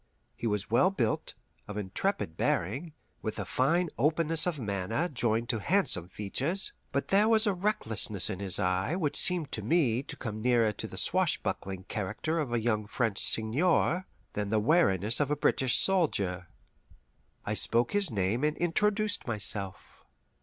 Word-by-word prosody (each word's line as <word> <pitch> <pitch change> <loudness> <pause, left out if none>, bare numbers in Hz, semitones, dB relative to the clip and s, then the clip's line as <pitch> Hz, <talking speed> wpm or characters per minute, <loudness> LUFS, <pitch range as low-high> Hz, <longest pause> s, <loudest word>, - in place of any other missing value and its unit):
He 115 - -4
was 105 -1 -3
well 120 +11 +4
built, 120 - -2 0.3
of 105 0 -7
intrepid 105 - -2
bearing, 135 - -2 0.3
with 110 - -4
a 100 - -4
fine 160 - +1
openness 160 +2 +1
of 170 -4 -2
manner 105 - -2
joined 120 -6 -1
to 115 -4 0
handsome 100 - 0
features. 135 - -1 0.2
But 140 - -2
there 205 +3 +4
was 220 0 +4
a 205 - +2
recklessness 115 - +1
in 95 - -5
his 95 -3 +3
eye 95 - 0
which 160 -6 -2
seemed 175 -5 +1
to - - -2
me 135 -8 +1
to - - -7
come 110 -3 -6
nearer 120 -2 +2
the - - -8
swashbuckling 95 -1 0
character 110 - -3
of 145 -6 -3
a 120 - +1
young 110 -2 -1
French 110 -3 -1
seigneur 160 +10 +1 0.3
than 105 -1 -3
the 110 +1 +2
wariness 110 - +2
of 145 -2 0
a 150 - +1
British 130 -3 +2
soldier. 100 - +2 1.0
I 105 - -2
spoke 115 +2 +2
his 200 -3 +3
name 105 +3 -1
and 150 0 0
introduced 210 +2 0
myself. 100 -4 -1
120 Hz, 160 wpm, -29 LUFS, 105-165 Hz, 1.0 s, well